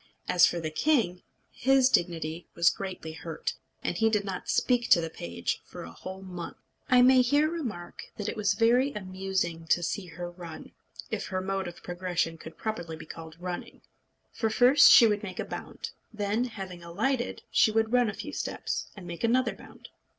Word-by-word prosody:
As 180 - +6
for 175 - -2
the 160 -1 -3
king, 190 - +1 0.3
his 265 0 +4
dignity 170 -6 0
was 170 0 +5
greatly 185 -4 -6
hurt, 160 0 -4 0.3
and - - -1
he 225 0 +3
did 210 -2 +1
not 190 -2 -5
speak 245 -2 +2
to - - +7
the 165 -1 -3
page 85 - -3
for - - -10
a 80 - -9
whole 190 - -8
month. 180 -3 -7 0.3
I 250 -2 +7
may 255 0 +7
here 290 +5 +3
remark 230 - -5
that 205 - -4
it - - -2
was 205 -2 +1
very 240 +5 +4
amusing 185 -4 -3
to 175 +2 +3
see 185 +2 -2
her 175 +2 -7
run, 175 -2 -10 0.4
if - - -2
her 185 +1 -2
mode 190 0 -2
of 175 - -10
progression 175 -2 -2
could 160 0 -11
properly 175 -7 -4
be 160 - -10
called 160 0 -10
running. 180 0 -6 0.5
For 225 - 0
first 250 +6 +7
she 235 - +9
would 210 -2 +2
make 185 -3 -7
a - - -1
bound; - - -7 0.2
then, 215 +2 0
having 190 -7 -7
alighted, 235 +9 -1
she - - +5
would 220 +1 +1
run 245 -2 +4
a 205 - -5
few 295 - -7
steps, - - -3
and 190 - -9
make 170 +3 -7
another 250 +3 +2
bound. - - -14
190 Hz, 190 wpm, -28 LUFS, 170-230 Hz, 0.5 s, she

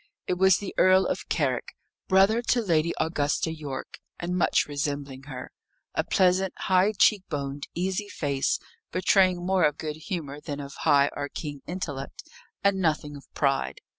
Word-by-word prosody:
It - - 0
was 190 -1 +6
the 200 - -6
Earl 185 0 +6
of - - -3
Carrick, - - -1 0.3
brother 195 +4 +4
to 240 0 +2
Lady 170 -3 +2
Augusta 160 0 0
Yorke, 145 -4 -7 0.2
and 175 +1 -2
much 180 - +3
resembling 140 -2 -4
her 130 -3 -7 0.4
a - - 0
pleasant, 185 0 +2
high 190 +3 +3
cheek 210 -1 +5
boned, 140 -2 -4
easy 190 +4 -1
face, 140 -6 0 0.3
betraying 185 -1 +3
more 190 -1 +2
of 150 -1 +2
good 155 -1 -4
humour 155 -4 -5
than 145 -1 -5
of 140 0 -7
high 145 -2 +3
or 145 0 -3
keen 145 -2 -6
intellect, 145 -6 -5 0.4
and 200 -1 +3
nothing 155 -4 0
of 140 - -12
pride. 135 -2 0
160 Hz, 160 wpm, -26 LUFS, 145-185 Hz, 0.4 s, was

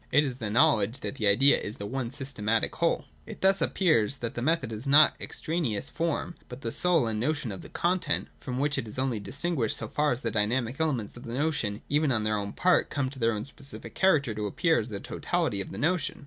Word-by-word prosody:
It 150 +3 +5
is 130 -4 -3
the 115 -5 -4
knowledge 110 +1 +3
that - - -5
the 110 - +1
idea 135 +8 +5
is 105 - -6
the 100 - -6
one 125 +2 -3
systematic 120 -5 -1
whole. - - +1 0.2
243.] - - -7
It - - -16
thus 195 0 +4
appears 140 - +2
that 120 -3 -5
the 120 - -4
method 140 -3 +1
is 110 +5 -5
not 145 +2 +7
an - - -27
ex - - -6
traneous 155 -11 -2
form, 165 +1 -2 0.2
but 125 +2 -9
the 115 - -3
soul 175 -3 +3
and 110 -1 -2
notion 140 -1 -1
of 95 - -7
the - - -11
content, 175 -4 0
from 125 -2 -5
which 140 +1 +1
it 115 - -5
is 105 - -6
only 130 -4 0
distinguished, 140 +1 -1
so 110 - -5
far 150 +6 +1
as 120 - -2
the 115 - -2
dynamic 115 +4 0
elements 130 -10 -1
of 120 - -10
the 115 - -5
notion 135 -8 -1
even 150 0 +2
on 110 -3 +1
their 110 0 +1
own 100 0 -4
part 180 0 +3
come 135 -3 -2
in 135 - -10
their 115 -1 +2
own 105 0 -4
specific 140 0 -5
character 145 - +3
to 105 0 -3
appear 160 - +2
as 110 - -4
the 100 -2 -5
totality 100 0 -1
of - - -7
the - - -7
notion. 160 - 0
130 Hz, 245 wpm, -28 LUFS, 110-150 Hz, 0.2 s, not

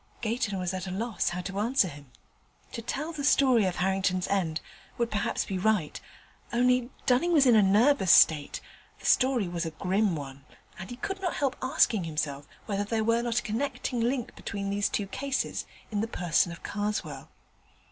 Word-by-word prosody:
Gayton 225 -3 -1
was 180 0 -2
at 185 0 -4
a - - -4
loss 220 +4 -1
how 180 +1 -4
to 195 +2 -5
answer 230 -1 +2
him. 145 -5 -11 0.6
To 230 - -5
tell 290 +7 -3
the 300 -3 -5
story 260 -6 +4
of 185 -2 -1
Harrington's 190 0 0
end 175 -5 0 0.4
would 235 -1 -1
perhaps 210 - -1
be 190 -2 -3
right; 190 -6 0 0.5
only, 250 0 +2 0.2
Dunning 260 +8 +3
was 290 -4 +5
in 245 - +6
a 215 - +7
nervous 205 +1 +4
state, 150 -3 +5 0.4
the - - -13
story 255 -6 +3
was 175 -1 -3
a 165 - -2
grim 190 +4 0
one, 140 -2 -8 0.4
and 190 - -7
he 245 - -6
could 390 +9 -5
not 360 -3 -1
help 270 -2 0
asking 225 -7 +2
himself 150 -3 -3 0.2
whether 205 -1 -1
there 220 +1 -1
were 230 +1 +2
not 235 -1 0
a - - -19
connecting 245 +2 -2
link 240 +1 -1
between 200 0 -4
these 200 0 +1
two 205 - -1
cases, 270 +6 -3 0.2
in 205 -1 0
the 225 - -1
person 175 -4 +1
of 170 - -10
Karswell. 205 -10 -3
205 Hz, 190 wpm, -28 LUFS, 180-245 Hz, 0.6 s, a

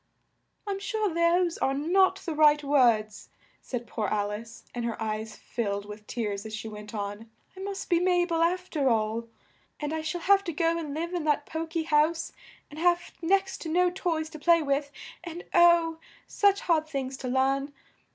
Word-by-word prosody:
"I'm 400 -1 -3
sure 425 -3 -1
those 340 +1 +2
are 270 - +1
not 370 +6 +3
the 330 - -4
right 300 -1 +5
words," 235 -7 +2 0.3
said 245 -2 -5
poor 220 -3 -3
Al 205 0 0
ice, 225 +2 -8
and 240 - -3
her 230 -1 -3
eyes 220 0 -3
filled 200 -4 -3
with 210 0 -10
tears 205 -4 -3
as 215 -1 -6
she 215 - -6
went 210 0 -9
on, 205 +2 -5 0.3
"I - - -11
must 395 0 -5
be 345 - +3
Ma 355 0 +3
bel 335 -2 -1
af 360 +2 +1
ter 280 -4 +2
all, 225 0 0 0.5
and 295 +1 -3
I 320 - -2
shall 315 +2 -3
have 395 +2 +4
to 340 - -3
go 330 +2 +1
and 305 -4 -4
live 340 +3 -3
in 350 -3 -1
that 295 -1 +1
po 320 +1 -4
ky 320 0 -2
house 315 +1 +2 0.4
and 300 - -9
have 350 0 +2
next 385 +3 +1
to 325 - -5
no 360 +2 +3
toys 330 -3 -2
to 310 - -9
play 335 +1 +4
with, 280 0 0 0.3
and 345 0 -7
oh! 340 -2 +5 0.3
such 400 -1 +2
hard 315 -3 +1
things 270 -3 -3
to 260 - -6
learn. 270 +2 +1
310 Hz, 195 wpm, -28 LUFS, 235-345 Hz, 0.5 s, right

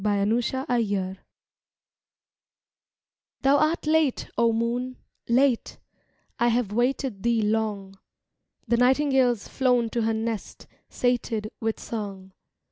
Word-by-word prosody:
BY 205 -1 +1
THE 215 - +2
INDUS 230 -6 -1 2.2
Thou 275 +1 +4
art 310 +2 +1
late, 310 -3 +1
O 235 0 +3
Moon, 240 +3 -2 0.3
Late, 250 0 +2 0.6
I 240 - +3
have 235 -3 +1
waited 245 -1 -1
thee 230 0 +1
long. 210 -3 -2 0.7
The 235 +1 +2
nightingale's 260 -2 +3
flown 245 -4 +1
to 235 - -1
her 225 0 +1
nest, 225 -1 -4 0.2
Sated 235 -3 -1
with 225 -1 -2
song. 195 -4 -6
235 Hz, 110 wpm, -25 LUFS, 215-255 Hz, 2.2 s, Thou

